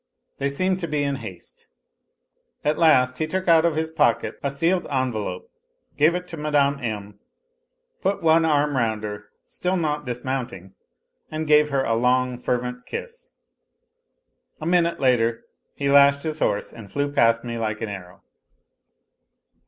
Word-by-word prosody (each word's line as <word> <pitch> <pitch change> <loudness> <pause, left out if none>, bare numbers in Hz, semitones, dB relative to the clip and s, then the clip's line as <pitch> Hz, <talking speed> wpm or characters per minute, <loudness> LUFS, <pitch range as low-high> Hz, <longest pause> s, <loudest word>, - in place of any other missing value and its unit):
They 140 - 0
seemed 185 +6 0
to 170 - -3
be 150 -1 -1
in 140 -1 -1
haste. 90 -8 -10 1.0
At 150 +1 +1
last 130 -6 +4
he 155 - 0
took 185 +3 -3
out 165 -1 +5
of 165 -2 +1
his 160 0 -2
pocket 115 -8 +1
a 140 - -1
sealed 165 +6 0
envelope, 115 -9 -3 0.4
gave 155 +4 +3
it 180 0 -4
to 165 - -7
Mme. 145 -2 +1
M., 105 -3 -5 0.8
put 200 - -1
one 165 0 +5
arm 150 -2 +2
round 110 -4 0
her, 105 -1 -6 0.2
still 185 +1 -2
not 150 -3 -1
dismounting, 120 -6 -4 0.6
and 155 0 -3
gave 150 0 +4
her 135 -1 +1
a 115 - 0
long, 125 +1 +1
fervent 125 0 -3
kiss. 480 0 -8 1.2
A 155 - -6
minute 170 0 +2
later 120 -3 +2 0.3
he 140 - -2
lashed 140 0 +6
his 155 -1 -3
horse 100 - -1
and 110 -4 -12
flew 145 0 -1
past 115 -4 +3
me 120 -1 -4
like 110 -1 -2
an 110 - -3
arrow. 95 -3 -9
140 Hz, 155 wpm, -23 LUFS, 115-155 Hz, 1.2 s, lashed